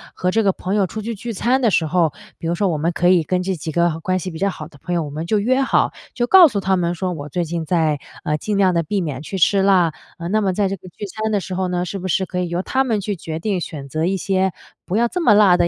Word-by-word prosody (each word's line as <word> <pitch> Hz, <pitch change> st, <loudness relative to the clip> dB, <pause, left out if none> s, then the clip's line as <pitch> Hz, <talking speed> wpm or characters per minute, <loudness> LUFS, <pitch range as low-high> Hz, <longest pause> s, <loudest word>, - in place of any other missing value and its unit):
和 180 Hz, 0 st, 0 dB
这 225 Hz, -, +2 dB
个 200 Hz, -2 st, +3 dB
朋 185 Hz, +1 st, -4 dB
友 200 Hz, -3 st, +2 dB
出 220 Hz, -, -6 dB
去 230 Hz, +2 st, -4 dB
聚 230 Hz, +3 st, -6 dB
餐 245 Hz, +6 st, +1 dB
的 235 Hz, -, +4 dB
时 170 Hz, -5 st, +2 dB
候， 160 Hz, -1 st, +2 dB, 0.3 s
比 165 Hz, -, -4 dB
如 170 Hz, -, 0 dB
说 200 Hz, +2 st, +1 dB
我 160 Hz, -, 0 dB
们 165 Hz, +3 st, 0 dB
可 175 Hz, +1 st, +1 dB
以 180 Hz, -2 st, +5 dB
跟 180 Hz, +3 st, -1 dB
这 190 Hz, 0 st, -1 dB
几 160 Hz, 0 st, -5 dB
个 170 Hz, 0 st, +1 dB
关 185 Hz, +2 st, 0 dB
系 185 Hz, 0 st, -4 dB
比 160 Hz, -, -8 dB
较 200 Hz, +1 st, +2 dB
好 155 Hz, -5 st, -7 dB
的 145 Hz, -4 st, -18 dB
朋 175 Hz, +4 st, -3 dB
友， 165 Hz, -, +1 dB
我 145 Hz, -, -6 dB
们 155 Hz, +3 st, -4 dB
就 215 Hz, -, +2 dB
约 255 Hz, +6 st, +2 dB
好， 265 Hz, -, +2 dB, 0.2 s
就 240 Hz, -, +1 dB
告 360 Hz, +5 st, +8 dB
诉 210 Hz, -8 st, -2 dB
他 190 Hz, 0 st, +1 dB
们 175 Hz, -1 st, 0 dB
说 180 Hz, +1 st, -2 dB
我 145 Hz, -3 st, -7 dB
最 175 Hz, +3 st, -1 dB
近 165 Hz, 0 st, -3 dB
在， 155 Hz, -4 st, +1 dB, 0.2 s
呃， 150 Hz, 0 st, 0 dB
尽 210 Hz, +5 st, -2 dB
量 190 Hz, -2 st, +4 dB
地 170 Hz, -, +2 dB
避 195 Hz, +5 st, -2 dB
免 145 Hz, -6 st, -3 dB
去 190 Hz, +5 st, -5 dB
吃 195 Hz, +3 st, +4 dB
辣。 180 Hz, -5 st, +4 dB, 0.2 s
呃， 170 Hz, 0 st, -5 dB
那 215 Hz, +3 st, +2 dB
么 190 Hz, -3 st, +1 dB
在 200 Hz, 0 st, +1 dB
这 195 Hz, -, -2 dB
个 185 Hz, -1 st, -13 dB
聚 205 Hz, -, -7 dB
餐 220 Hz, +2 st, -3 dB
的 205 Hz, -, +2 dB
时 185 Hz, 0 st, -6 dB
候 185 Hz, 0 st, -1 dB
呢， 180 Hz, 0 st, -1 dB
是 195 Hz, +2 st, -5 dB
不 185 Hz, -, -4 dB
是 190 Hz, +1 st, +1 dB
可 180 Hz, 0 st, -4 dB
以 180 Hz, -1 st, -1 dB
由 175 Hz, +1 st, -1 dB
他 265 Hz, +5 st, +1 dB
们 225 Hz, -5 st, 0 dB
去 200 Hz, 0 st, -3 dB
决 160 Hz, -1 st, -5 dB
定 195 Hz, -2 st, -1 dB
选 140 Hz, -4 st, -6 dB
择 155 Hz, +4 st, -1 dB
一 190 Hz, +1 st, 0 dB
些 190 Hz, 0 st, +1 dB, 0.4 s
不 190 Hz, -, 0 dB
要 235 Hz, +1 st, +3 dB
这 360 Hz, -, -3 dB
么 240 Hz, -11 st, +5 dB
辣 200 Hz, -4 st, +6 dB
的 175 Hz, -, +3 dB
185 Hz, 335 characters per minute, -20 LUFS, 170-205 Hz, 0.4 s, 告